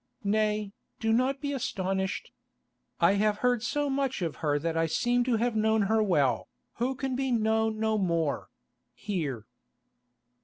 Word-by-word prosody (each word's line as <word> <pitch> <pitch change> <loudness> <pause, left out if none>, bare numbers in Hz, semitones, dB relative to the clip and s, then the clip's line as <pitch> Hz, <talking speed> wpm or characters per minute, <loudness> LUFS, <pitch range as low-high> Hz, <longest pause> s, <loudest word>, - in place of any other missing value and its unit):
Nay, 210 0 0 0.3
do 225 -1 +1
not 260 +3 +2
be 285 -1 -2
astonished. 190 -6 -2 0.7
I 195 - +5
have 210 -1 +2
heard 245 -2 +3
so 290 +5 -1
much 270 -6 -1
of 165 -3 -3
her 145 -2 +1
that 165 +2 -2
I 165 0 +2
seem 245 +9 +1
to 245 -2 +2
have 235 +1 0
known 220 0 +3
her 220 +2 +2
well, 145 - +2 0.3
who 255 +3 0
can 265 -1 -2
be 265 0 -1
known 220 -1 +1
no 220 -1 +1
more—here." 145 - -3
215 Hz, 150 wpm, -28 LUFS, 175-245 Hz, 0.7 s, I